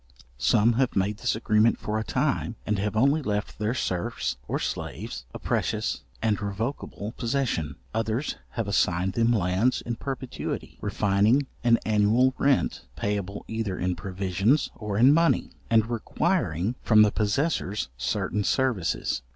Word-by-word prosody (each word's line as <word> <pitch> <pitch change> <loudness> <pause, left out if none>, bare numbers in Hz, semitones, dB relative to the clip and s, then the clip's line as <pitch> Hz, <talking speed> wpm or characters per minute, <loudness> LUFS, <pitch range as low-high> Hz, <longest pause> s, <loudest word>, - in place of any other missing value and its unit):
Some 105 - +4
have 130 - 0
made 100 +2 +1
this 125 0 0
agreement 110 0 +3
for 105 +1 -2
a - - -2
time, 125 0 -1
and 105 -2 0
have 105 +1 -1
only 140 +7 +3
left 105 -6 -3
their 110 +3 0
serfs, 95 - -2
or - - -1
slaves, 80 - -4
a - - -7
precious - - -1 0.2
and 110 -2 +1
revocable 105 +1 -4
possession. 115 - -1 0.2
Others 115 +5 -1 0.2
have 115 -4 -2
assigned 95 -2 +1
them 115 +2 +2
lands 100 +3 +2
in 120 -1 -4
perpetuity, 135 -1 -5
refining 105 +6 +2 0.2
an 120 -1 +5
annual 110 +5 +3
rent 140 -1 +1
payable 100 -1 -3
either 110 -4 -3
in 90 0 -1
provisions 95 - 0
or 105 -2 -4
in 130 +6 +7
money, 165 -4 +2 0.2
and 110 -2 +4
requiring 110 -4 0
from 110 -2 +6
the 105 - +3
possessors 105 - 0
certain 105 +10 -1
services. 120 -8 0
110 Hz, 145 wpm, -26 LUFS, 100-120 Hz, 0.2 s, in